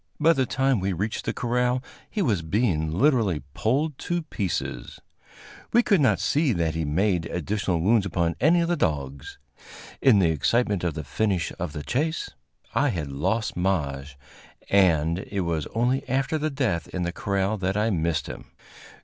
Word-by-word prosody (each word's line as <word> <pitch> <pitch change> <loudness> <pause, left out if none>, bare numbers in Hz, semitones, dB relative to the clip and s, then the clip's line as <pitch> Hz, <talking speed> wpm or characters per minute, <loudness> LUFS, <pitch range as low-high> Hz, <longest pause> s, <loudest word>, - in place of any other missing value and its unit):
By 160 +2 +5
the 135 -4 0
time 135 -2 +1
we 95 +1 -1
reached 105 +5 -3
the - - 0
corral, 125 +1 0 0.3
he 210 - -1
was 105 - +1
being 80 -3 0
literally 105 - +2
pulled 140 +5 0
to 175 -1 -2
pieces. 95 - -4 0.7
We 240 +1 +5
could 200 -9 +3
not 105 - +3
see 150 -4 +2
that 85 -3 0
he 80 0 -2
made 85 +3 +1
additional 90 0 -1
wounds 100 +2 +3
upon 85 -2 0
any 170 +6 +5
of 170 - 0
the 175 - +1
dogs. 70 - -3 0.6
In 130 -6 +6
the 90 -4 +4
excitement 100 - +1
of 85 -4 -1
the 80 - -4
finish 95 +4 -1
of 85 -4 -3
the 75 - -5
chase 150 - -1 0.4
I 145 - +2
had 80 - -3
lost 110 +12 -1
Maje, 75 -7 -1 0.6
and 85 -4 +3
it 100 0 -4
was 85 -4 -2
only 125 +4 0
after 135 +5 0
the 155 +1 0
death 130 - -1
in 90 - -3
the 85 0 -2
corral 100 +2 -1
that 95 +2 -1
I 110 +2 +1
missed 80 -3 0
him. - - -8
100 Hz, 175 wpm, -25 LUFS, 85-125 Hz, 0.7 s, In